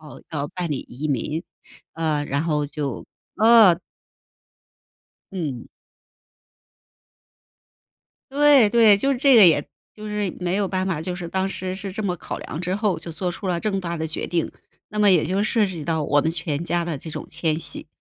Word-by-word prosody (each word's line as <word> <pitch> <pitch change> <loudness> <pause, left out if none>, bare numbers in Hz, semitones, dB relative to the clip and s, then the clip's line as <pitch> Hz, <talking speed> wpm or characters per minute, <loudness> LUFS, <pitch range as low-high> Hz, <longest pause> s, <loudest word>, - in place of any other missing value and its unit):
要 150 -2 -12 0.2
要 145 +1 -3
办 175 -3 -3
理 140 - -1
移 135 +6 -5
民。 150 +5 -2 0.5
呃， 155 -3 -1
然 140 +1 -1
后 150 -3 0
就 140 -4 -5 0.3
呃 220 -5 +7 1.6
嗯。 145 -10 -4 2.7
对 280 -6 +5
对， 225 -3 +6
就 275 +7 +1
是 250 - -3
这 275 -1 +5
个 210 -5 +9
也 150 -3 +4 0.3
就 215 0 -8
是 210 -3 -2
没 180 +1 -1
有 205 - +1
办 185 0 -2
法， 170 -5 -2
就 180 +2 -3
是 175 -2 -6
当 190 +1 -1
时 185 -1 -3
是 195 0 -6
这 215 - -4
么 180 -3 -1
考 - - -6
量 - - -7
之 180 +2 -2
后 210 -2 0
就 165 - -7
做 180 +2 -3
出 180 +3 -7
了 175 -2 -1
这 215 - -1
么 195 - -1
大 170 -2 -4
的 160 -1 -3
决 160 - -3
定， 170 -2 -1 0.4
那 210 - -6
么 205 -1 +5
也 175 -4 +4
就 195 +3 0
涉 215 -1 +2
及 170 -6 -6
到 160 -1 -1
我 145 0 +2
们 160 - 0
全 165 -2 -3
家 175 0 0
的 165 -3 -3
这 160 +4 -9
种 155 -1 -6
迁 160 -2 -1
徙。 - - -3
175 Hz, 205 characters per minute, -23 LUFS, 155-200 Hz, 2.7 s, 个